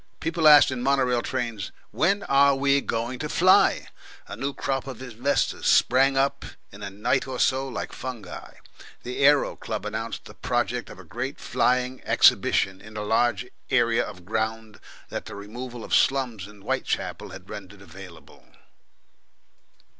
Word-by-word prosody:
People 165 -1 +1
asked 150 -2 +8
in 130 -2 -4
mono 135 +1 +2
rail 125 -1 +1
trains, 120 -8 -4 0.2
"When 195 +5 +1
are 140 0 +4
we 140 +1 +2
going 120 +1 -3
to - - -4
fly?" - - +4 0.4
A - - -7
new 140 +1 -3
crop 135 -1 -3
of 130 -4 -7
inventors 130 +2 -1
sprang 135 +2 +4
up 135 +1 +1 0.3
in 100 - -13
a 100 - -5
night 120 +7 -1
or 130 -1 -5
so 135 +1 +2
like 125 - -5
fungi. 120 -7 -8 0.5
The 125 +1 -5
Aero 145 0 +4
Club 110 -2 -5
announced 110 +2 -5
the - - -11
project 120 -1 -2
of - - -11
a - - -12
great 130 +3 -5
Flying 125 +1 0
Exhibition 95 0 +3
in 110 +1 -11
a 105 - -3
large 120 +3 +1 0.2
area 120 -2 +2
of 90 -2 -10
ground 110 0 -3 0.3
that - - -5
the - - -8
removal 120 +4 -8
of - - -6
slums 125 -8 +1
in 105 -1 -16
Whitechapel - - -3
had 95 0 -11
rendered 95 0 -10
available. 85 -4 -14
120 Hz, 160 wpm, -25 LUFS, 105-135 Hz, 0.5 s, asked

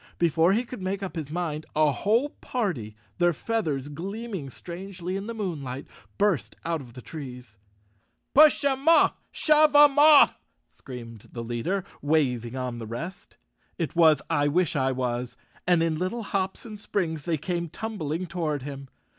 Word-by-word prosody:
Before 170 +2 +3
he 230 +4 +1
could 245 -3 -9
make 190 +2 -2
up 190 - -5
his 155 -4 -4
mind, 155 -2 -3
a 155 -1 +4
whole 225 - +1
party, 175 - -3 0.2
their 175 0 +4
feathers 155 - -2
gleaming 190 +1 -5
strangely 180 +4 -6
in 195 +2 -4
the 230 - -5
moon¬ 185 -9 -3
light, 130 +1 -6 0.3
burst 200 -7 +1
out 165 -2 -1
of 120 -3 -13
the 125 - -10
trees. 125 -7 -9 0.8
"Push 300 +1 +7
'em 275 +1 0
off! 330 - +5
Shove 305 -1 +4
'em 290 -1 +7
off!" 300 -1 +7 0.2
screamed 115 -4 -11
the 115 - -5
leader, 120 +12 -2 0.2
waving 130 -6 +1
on 125 -2 -3
the 115 - -6
rest. 165 - -7 0.4
It 165 -2 -3
was 160 -3 +5
I 145 -3 +2
wish 170 +2 +1
I 135 -1 +2
was, 125 -1 -3 0.3
and 175 -2 +4
in 160 -2 0
little 205 +6 -2
hops 190 0 -2
and 215 -2 -8
springs 160 -7 -2
they 165 -2 0
came 170 +2 -3
tumbling 180 -5 -4
toward 160 -5 -2
him. 140 -1 -7
165 Hz, 165 wpm, -26 LUFS, 140-200 Hz, 0.8 s, Push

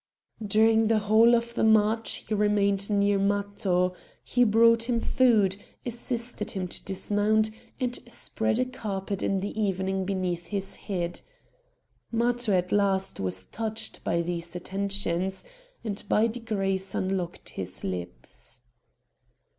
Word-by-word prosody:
During 220 +2 +4
the 225 0 +3
whole 220 +3 +5
of 235 0 -1
the 235 - 0
march 220 +1 +3
he - - -2
remained 200 -1 +2
near 200 -1 +2
Matho; 200 -2 +1 0.3
he 245 - +2
brought 230 +1 +4
him 235 -1 +2
food, 220 -7 +3 0.3
assisted 235 -1 -3
him 185 -2 -3
to - - -5
dismount, 210 +3 +1 0.3
and 250 -2 -1
spread 110 - -1
a - - +2
carpet 200 -5 -4
in 195 -1 0
the 200 - -4
evening 190 -1 0
beneath 180 -3 -2
his 195 -1 -2
head. 175 -4 -4 0.9
Matho 240 0 +1
at 180 -1 +1
last 195 -2 +1
was 95 0 -2
touched 220 - -4
by 170 0 0
these 170 0 -4
attentions, 190 0 -2 0.4
and 210 -3 -4
by 215 - +4
degrees 195 -5 -2
unlocked 185 -2 -2
his 95 -1 -6
lips. 90 +6 -7
200 Hz, 130 wpm, -27 LUFS, 190-225 Hz, 0.9 s, whole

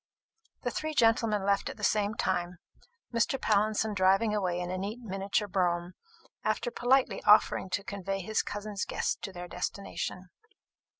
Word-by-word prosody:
The - - -1
three 310 0 -3
gentlemen 225 -4 +3
left 200 0 +1
at - - -8
the 210 - -10
same 210 0 +2
time, 180 -3 -1 0.6
Mr. 235 +3 +1
Pallinson 215 +1 +2
driving 195 +3 +3
away 185 -4 0
in 180 0 -3
a 185 - -2
neat 205 +4 -4
miniature 200 -1 -1
brougham, 175 -2 0 0.5
after - - 0
politely 260 - +2
offering 210 -2 +5
to 190 +2 -1
convey 195 -2 -4
his 215 +4 0
cousin's 205 -1 -4
guests - - -1
to 195 - -5
their 180 -1 -7
destination. 180 0 -4
200 Hz, 155 wpm, -30 LUFS, 185-215 Hz, 0.6 s, offering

